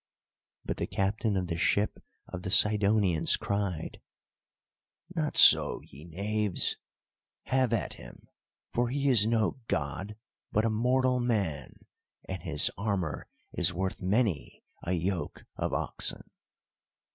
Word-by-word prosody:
But -, -, -3 dB
the -, -, -2 dB
captain 100 Hz, +2 st, -1 dB
of 90 Hz, -, -1 dB
the 85 Hz, -2 st, -3 dB
ship 100 Hz, +4 st, 0 dB, 0.2 s
of 95 Hz, -, -7 dB
the 95 Hz, -, -5 dB
Sidonians 105 Hz, -4 st, +3 dB
cried: 100 Hz, -5 st, -3 dB, 1.1 s
"Not 155 Hz, -3 st, -1 dB
so, -, -, +7 dB
ye 70 Hz, +4 st, -14 dB
knaves! 100 Hz, +3 st, -1 dB, 0.7 s
Have 130 Hz, -2 st, +1 dB
at 105 Hz, -, -1 dB
him, -, -, -14 dB, 0.5 s
for 120 Hz, 0 st, +1 dB
he 140 Hz, +2 st, -1 dB
is 110 Hz, -5 st, +5 dB
no 115 Hz, +3 st, +1 dB
god, 90 Hz, +8 st, -3 dB, 0.4 s
but 110 Hz, +1 st, +1 dB
a 115 Hz, -, +1 dB
mortal 125 Hz, +3 st, +2 dB
man; 100 Hz, -, -2 dB, 0.4 s
and 95 Hz, -2 st, -5 dB
his 80 Hz, -3 st, +2 dB
armour 100 Hz, -7 st, -2 dB, 0.3 s
is 85 Hz, -, +1 dB
worth 95 Hz, +1 st, -3 dB
many 95 Hz, -, -1 dB, 0.2 s
a 90 Hz, -, -2 dB
yoke 90 Hz, +1 st, -3 dB
of -, -, -2 dB
oxen!" -, -, -1 dB
100 Hz, 125 wpm, -29 LUFS, 90-115 Hz, 1.1 s, so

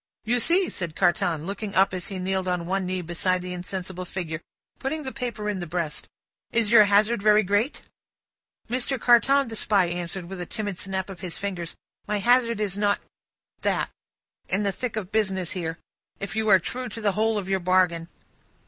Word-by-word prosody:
"You 240 Hz, +3 st, +2 dB
see?" 360 Hz, +9 st, +4 dB
said 170 Hz, -4 st, -4 dB
Carton, 175 Hz, -3 st, +1 dB
looking 200 Hz, +1 st, -4 dB
up, 190 Hz, 0 st, +4 dB
as 180 Hz, -2 st, -3 dB
he 195 Hz, -, -5 dB
kneeled 190 Hz, 0 st, -1 dB
on 180 Hz, -2 st, -1 dB
one 190 Hz, +1 st, -1 dB
knee 185 Hz, 0 st, -2 dB
beside 180 Hz, +2 st, 0 dB
the 180 Hz, 0 st, -5 dB
insensible 185 Hz, 0 st, -5 dB
figure, 170 Hz, -3 st, -5 dB, 0.4 s
putting 300 Hz, +3 st, -2 dB
the 265 Hz, -, -3 dB
paper 240 Hz, -5 st, -4 dB
in 205 Hz, -2 st, -1 dB
the 175 Hz, -, -5 dB
breast: 165 Hz, -2 st, -3 dB, 0.4 s
"is 230 Hz, -2 st, +2 dB
your 215 Hz, -3 st, +9 dB
hazard 205 Hz, +2 st, +3 dB
very 215 Hz, +1 st, +5 dB
great?" 205 Hz, +8 st, 0 dB, 0.8 s
"Mr. 255 Hz, +2 st, +1 dB
Carton," 265 Hz, +4 st, +5 dB
the 225 Hz, -, -6 dB
Spy 200 Hz, -3 st, +3 dB
answered, 175 Hz, +1 st, -4 dB
with 185 Hz, +1 st, -7 dB
a 175 Hz, -, -5 dB
timid 205 Hz, -5 st, -4 dB
snap 190 Hz, 0 st, -3 dB
of 185 Hz, -, -10 dB
his 170 Hz, -5 st, -5 dB
fingers, 175 Hz, -3 st, -4 dB, 0.3 s
"my 210 Hz, -, 0 dB
hazard 235 Hz, +1 st, +3 dB
is 205 Hz, -2 st, -1 dB
not 205 Hz, -1 st, +2 dB, 0.6 s
that, -, -, 0 dB, 0.6 s
in 195 Hz, +2 st, +1 dB
the 200 Hz, -, +1 dB
thick 240 Hz, +4 st, -4 dB
of 205 Hz, -3 st, -4 dB
business 190 Hz, -5 st, 0 dB
here, 165 Hz, -2 st, -3 dB, 0.4 s
if 200 Hz, -, -4 dB
you 220 Hz, 0 st, +1 dB
are 195 Hz, -, +9 dB
true 250 Hz, +7 st, -4 dB
to 225 Hz, -, -7 dB
the 210 Hz, -2 st, +2 dB
whole 220 Hz, +2 st, +1 dB
of 195 Hz, -3 st, -3 dB
your 190 Hz, 0 st, +1 dB
bargain." 180 Hz, -2 st, +2 dB
195 Hz, 195 wpm, -25 LUFS, 180-220 Hz, 0.8 s, your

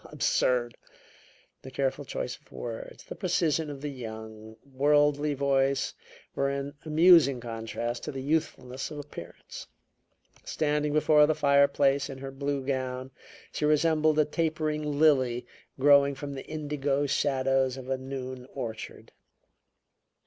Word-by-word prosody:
How -, -, -14 dB
absurd!" 120 Hz, -2 st, +1 dB, 0.8 s
The 130 Hz, -, -9 dB
careful 135 Hz, +2 st, -2 dB
choice 125 Hz, -, -4 dB
of -, -, -24 dB
words, 115 Hz, -2 st, -7 dB
the -, -, -8 dB
precision 165 Hz, -4 st, 0 dB
of 140 Hz, -2 st, -7 dB
the 150 Hz, -, -3 dB
young, 110 Hz, -3 st, -9 dB
worldly 145 Hz, +2 st, +2 dB
voice 135 Hz, 0 st, +1 dB, 0.4 s
were 140 Hz, 0 st, 0 dB
in 140 Hz, +1 st, -4 dB
amusing 155 Hz, -4 st, +5 dB
contrast 115 Hz, +1 st, -5 dB
to -, -, -4 dB
the 135 Hz, -, -6 dB
youthfulness 135 Hz, -4 st, -2 dB
of 150 Hz, -, -8 dB
appearance. 145 Hz, 0 st, -10 dB, 0.8 s
Standing 150 Hz, -1 st, -1 dB
before 150 Hz, 0 st, +5 dB
the 155 Hz, -, +1 dB
fireplace 140 Hz, -1 st, +3 dB
in 135 Hz, -, -7 dB
her 135 Hz, 0 st, -7 dB
blue 140 Hz, 0 st, -3 dB
gown, 130 Hz, -1 st, -3 dB, 0.4 s
she -, -, -4 dB
resembled 155 Hz, 0 st, +3 dB
a 155 Hz, -, +4 dB
tapering 155 Hz, -1 st, -1 dB, 0.2 s
lily 130 Hz, -6 st, +3 dB, 0.3 s
growing 140 Hz, 0 st, +5 dB
from 140 Hz, +1 st, -6 dB
the 135 Hz, -, -8 dB
indigo 145 Hz, -2 st, -1 dB
shadows 135 Hz, -2 st, +1 dB
of 130 Hz, -1 st, -9 dB
a 135 Hz, 0 st, -1 dB
noon 130 Hz, -1 st, -6 dB
orchard. 115 Hz, -1 st, -7 dB
140 Hz, 135 wpm, -28 LUFS, 130-150 Hz, 0.8 s, amusing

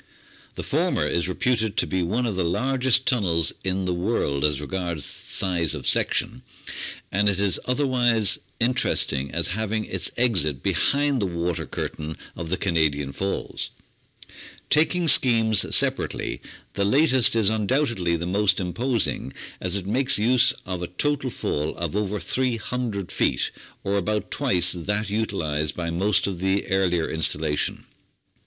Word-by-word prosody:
The -, -, -5 dB
former -, -, 0 dB
is 85 Hz, +1 st, -1 dB
reputed 110 Hz, +1 st, 0 dB
to -, -, +2 dB
be 95 Hz, -1 st, -1 dB
one 110 Hz, +9 st, -1 dB
of 110 Hz, -5 st, -2 dB
the 95 Hz, -, 0 dB
largest 130 Hz, +8 st, +2 dB
tunnels 85 Hz, -, +2 dB
in 95 Hz, 0 st, -1 dB
the 90 Hz, -, 0 dB
world 85 Hz, -7 st, -1 dB
as 75 Hz, -2 st, +1 dB
regards 85 Hz, 0 st, -4 dB
size 85 Hz, -5 st, -2 dB
of -, -, -7 dB
section, -, -, 0 dB, 0.7 s
and 100 Hz, +2 st, +3 dB
it 95 Hz, -1 st, -1 dB
is 100 Hz, -2 st, +1 dB
otherwise 125 Hz, -5 st, +2 dB, 0.2 s
interesting 115 Hz, -, +1 dB
as 85 Hz, +4 st, -2 dB
having 110 Hz, +2 st, -2 dB
its -, -, -4 dB
exit 90 Hz, -, +1 dB
behind 140 Hz, -3 st, +1 dB
the 100 Hz, -, 0 dB
water 85 Hz, -1 st, -3 dB
curtain 80 Hz, +1 st, -5 dB, 0.2 s
of 85 Hz, -1 st, -6 dB
the 95 Hz, -, 0 dB
Canadian 75 Hz, -6 st, 0 dB
Falls. 95 Hz, +7 st, -3 dB, 1.0 s
Taking 165 Hz, +3 st, +2 dB
schemes 115 Hz, -7 st, +6 dB
separately, -, -, 0 dB, 0.3 s
the 100 Hz, -, -1 dB
latest 130 Hz, +2 st, +4 dB
is 110 Hz, -2 st, +3 dB
undoubtedly 110 Hz, -, 0 dB
the 85 Hz, +1 st, -3 dB
most 100 Hz, +3 st, +2 dB
imposing, 110 Hz, -, -1 dB, 0.3 s
as -, -, -2 dB
it 100 Hz, -2 st, -2 dB
makes 130 Hz, +6 st, +2 dB
use 125 Hz, +3 st, +4 dB
of 90 Hz, -1 st, -4 dB
a 90 Hz, -, -3 dB
total 140 Hz, -, -1 dB
fall 75 Hz, -9 st, -3 dB
of 85 Hz, +1 st, -4 dB
over 105 Hz, 0 st, -1 dB
300 120 Hz, -5 st, -2 dB
feet, 65 Hz, -, 0 dB, 0.3 s
or 100 Hz, +1 st, 0 dB
about 105 Hz, +2 st, -2 dB
twice 90 Hz, -2 st, +3 dB
that 100 Hz, +4 st, -2 dB
utilised 80 Hz, -9 st, -2 dB
by 85 Hz, -1 st, -3 dB
most 95 Hz, +4 st, +2 dB
of 95 Hz, -3 st, -3 dB
the 95 Hz, +2 st, 0 dB
earlier 90 Hz, -4 st, +1 dB
installation. 80 Hz, -2 st, 0 dB
100 Hz, 145 wpm, -24 LUFS, 85-115 Hz, 1.0 s, schemes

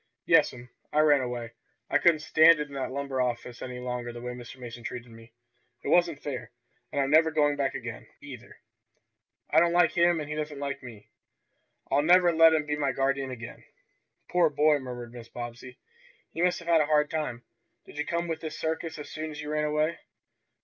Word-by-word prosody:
"Yes'm, 120 Hz, 0 st, +3 dB, 0.2 s
I 150 Hz, -, +3 dB
ran 145 Hz, -3 st, +5 dB
away. 120 Hz, -2 st, -4 dB, 0.4 s
I -, -, +2 dB
couldn't 165 Hz, -3 st, +4 dB
stand 160 Hz, +1 st, +6 dB
it 150 Hz, 0 st, -3 dB
in -, -, -12 dB
that 135 Hz, -1 st, -3 dB
lumber 135 Hz, -1 st, -2 dB
office 125 Hz, -1 st, -3 dB
any 125 Hz, -1 st, -6 dB
longer 125 Hz, -1 st, -4 dB
the 120 Hz, -, -9 dB
way 125 Hz, +1 st, -5 dB
Mr. 125 Hz, +1 st, -10 dB
Mason 120 Hz, -1 st, -9 dB
treated 120 Hz, 0 st, -7 dB
me. 115 Hz, 0 st, -15 dB, 0.5 s
It -, -, -3 dB
wasn't 170 Hz, -4 st, +2 dB
fair. 125 Hz, -5 st, -5 dB, 0.4 s
And -, -, -2 dB
I'm 135 Hz, 0 st, +1 dB
never 160 Hz, +1 st, +6 dB
going 150 Hz, -2 st, +2 dB
back 140 Hz, -2 st, -1 dB
again, -, -, -7 dB
either. -, -, -11 dB, 0.9 s
I 155 Hz, -, +6 dB
don't 170 Hz, +1 st, +3 dB
like 175 Hz, -2 st, +4 dB
him, 170 Hz, -1 st, +3 dB
and 150 Hz, -, -5 dB
he 150 Hz, -, -4 dB
doesn't 150 Hz, -1 st, -4 dB
like 140 Hz, 0 st, -4 dB
me. 115 Hz, -5 st, -12 dB, 0.8 s
I'll 145 Hz, -, +4 dB
never 175 Hz, +2 st, +5 dB
let 165 Hz, 0 st, +6 dB
him 150 Hz, -1 st, 0 dB
be 150 Hz, 0 st, -1 dB
my 140 Hz, -3 st, 0 dB
guardian 135 Hz, 0 st, 0 dB
again." 120 Hz, -2 st, -9 dB, 0.6 s
"Poor 175 Hz, -2 st, +3 dB
boy!" 150 Hz, 0 st, +3 dB
murmured 120 Hz, -2 st, -8 dB
Mrs. 115 Hz, -1 st, -12 dB
Bobbsey. 120 Hz, +1 st, -8 dB, 0.6 s
"You 170 Hz, -, +1 dB
must 180 Hz, -, +1 dB
have 170 Hz, -, -11 dB
had 165 Hz, -2 st, +5 dB
a 150 Hz, -, 0 dB
hard 150 Hz, -1 st, +2 dB
time. 150 Hz, -7 st, -3 dB, 0.4 s
Did 150 Hz, -, -11 dB
you 150 Hz, -, -1 dB
come 170 Hz, 0 st, -1 dB
with 160 Hz, -1 st, -4 dB
this 155 Hz, -1 st, -6 dB
circus 160 Hz, 0 st, -3 dB
as 150 Hz, -, -8 dB
soon 155 Hz, 0 st, -5 dB
as 150 Hz, -1 st, -8 dB
you 150 Hz, 0 st, -5 dB
ran 150 Hz, 0 st, 0 dB
away?" 155 Hz, +2 st, 0 dB
145 Hz, 205 wpm, -28 LUFS, 125-160 Hz, 0.9 s, stand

